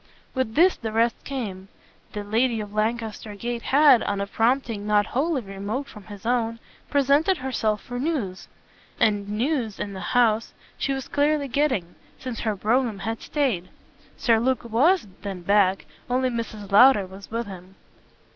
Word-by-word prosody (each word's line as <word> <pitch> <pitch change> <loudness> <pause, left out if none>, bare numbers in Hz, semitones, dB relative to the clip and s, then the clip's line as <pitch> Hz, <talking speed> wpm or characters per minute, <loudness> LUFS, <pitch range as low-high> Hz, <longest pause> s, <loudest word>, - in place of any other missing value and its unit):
With 260 -5 -2
this 360 +4 +5
the 220 -2 -4
rest 230 +1 +1
came: 205 -9 -5 0.5
the 210 - -4
lady 225 +3 +1
of 205 -1 -6
Lancaster 220 -1 -2
Gate 235 +3 -4
had, 275 -2 +5
on 200 -1 -2
a 200 - -1
prompting 225 0 0
not 210 -1 +3
wholly 275 +2 -1
remote 200 +7 -4
from 210 -3 -12
his 205 -1 -11
own, 230 -1 0 0.3
presented 285 +6 +3
herself 225 -5 -1
for 245 0 -5
news; 250 - -2 0.5
and 205 -2 +2
news, 230 0 -1
in 200 - -4
the 190 - -6 0.2
house, 225 -2 +3 0.2
she 275 - -2
was 270 -1 -3
clearly 290 0 +1
getting, 255 - 0 0.2
since 255 -3 -6
her 215 -2 -1
brougham 225 +2 +1
had 225 +3 -4
stayed. 235 - -1 0.5
Sir 230 -3 +3
Luke 255 +1 0
WAS 270 - +3 0.2
then 195 -3 -5
back 195 0 +3 0.2
only 255 +1 +1
Mrs. 215 -4 -5
Lowder 210 -1 +7
was 190 +2 -12
with 230 +1 -2
him. 190 -1 -11
225 Hz, 160 wpm, -24 LUFS, 205-260 Hz, 0.5 s, Lowder